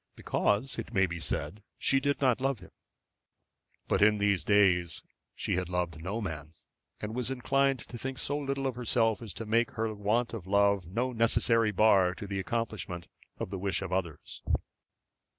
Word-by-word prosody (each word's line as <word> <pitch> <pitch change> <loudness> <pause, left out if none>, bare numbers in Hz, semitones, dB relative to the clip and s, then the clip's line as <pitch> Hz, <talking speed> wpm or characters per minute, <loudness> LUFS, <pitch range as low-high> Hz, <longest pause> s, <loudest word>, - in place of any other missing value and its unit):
Because, 105 +6 0
it 115 - -6
may 95 0 +5
be 85 -1 -5
said, 100 +5 -3 0.2
she 135 - +3
did 140 +1 0
not 130 -2 +3
love 135 -1 +1
him. 90 - -15 1.2
But - - +1
in 105 +1 +5
these 100 -2 +2
days 90 -5 +3 0.3
she - - -1
had 90 -1 -2
loved 85 -3 -2
no 100 +5 -2
man, 80 -6 -6 0.4
and 105 +1 -5
was 125 0 -1
inclined 135 +2 +2
to 120 - -8
think 135 +1 -3
so 145 - 0
little 140 -1 -2
of 130 - 0
herself 115 -2 +1
as 110 -4 -6
to 115 - -5
make 115 +2 +2
her 110 -1 -1
want 110 +4 0
of 100 -6 -6
love 100 -2 +3
no 120 +8 -1
necessary 115 0 +3
bar 95 -3 +4
to 100 - -7
the 100 -1 -3
accomplishment 95 -5 -3 0.3
of - - -5
the 95 - -3
wish 100 +1 -1
of 95 -1 -4
others. 85 -6 -3
105 Hz, 180 wpm, -30 LUFS, 95-120 Hz, 1.2 s, may